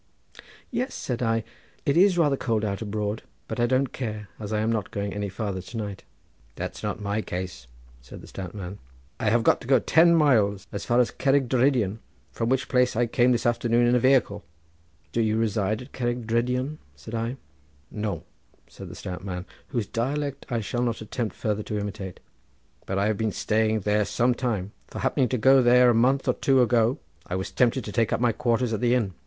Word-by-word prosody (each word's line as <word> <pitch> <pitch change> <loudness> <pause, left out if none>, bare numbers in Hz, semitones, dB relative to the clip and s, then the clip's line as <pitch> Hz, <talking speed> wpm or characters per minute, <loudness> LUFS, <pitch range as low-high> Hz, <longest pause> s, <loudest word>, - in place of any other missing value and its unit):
"Yes," 255 +2 -2
said 125 -2 -3
I; 115 -1 +1 0.4
"it 140 - +2
is 185 +1 +5
rather 150 -5 +3
cold 115 -5 -1
out 100 0 -3
abroad, 105 0 -2 0.3
but - - -5
I 120 - +3
don't 130 +1 +1
care, 105 -5 -5
as 105 -1 -6
I 105 - +1
am 110 +1 +1
not 110 -3 -1
going 100 -1 -3
any 105 0 -3
farther 100 -1 -3
to 110 +6 -9
night." 100 -3 -5 0.5
"That's - - -5
not - - -3
my 105 +1 -1
case," 90 - -6 0.3
said 60 - -11
the - - -12
stout 95 0 -8
man, 95 -1 -7 0.4
"I 110 - +1
have 115 +2 +3
got - - +3
to - - -10
go 135 0 +6
ten 170 +7 +5
miles, 110 - +3
as 100 - -5
far 120 +1 +3
as 125 - +3
Cerrig 135 -1 +3
Drudion, 120 -5 +2 0.3
from 115 0 -2
which 130 0 +1
place 125 -2 +2
I 120 +2 +3
came 120 +2 +3
this 120 -1 0
afternoon 120 0 +2
in 120 - +3
a 125 - +4
wehicle." 120 -5 +3 0.7
"Do 115 - +1
you 110 -1 +1
reside 110 0 0
at - - -15
Cerrig 120 -1 -2
Drudion?" 125 +6 0 0.2
said 75 +10 -11
I. 115 +3 -2 0.5
"No," 105 -1 -3 0.4
said - - -10
the - - -9
stout 90 0 -6
man, 90 -2 -5 0.2
whose 120 -6 -2
dialect 140 +6 -3
I 120 -3 -1
shall 120 +3 -2
not 120 -2 -1
attempt 110 +1 -4
further 105 -1 -1
to 105 0 -4
imitate, 100 -3 -5 0.7
"but 95 - -2
I 100 - +2
have 110 -1 +1
been 110 -1 0
staying 110 +1 +1
there 105 +1 +2
some 120 +5 +2
time; 110 -6 -2 0.2
for - - -10
happening 130 -3 +1
to 130 - 0
go 135 +4 +6
there 125 0 +6
a - - +2
month 130 +4 +2
or - - +4
two 135 -1 +2
ago 120 +2 +2 0.3
I 90 - -3
was 95 0 -3
tempted 125 0 +2
to 105 - -5
take 115 0 +1
up - - +1
my 120 -1 +3
quarters 120 +1 0
at 105 - -2
the 120 0 +3
inn. 105 -7 0
115 Hz, 210 wpm, -26 LUFS, 105-125 Hz, 0.7 s, go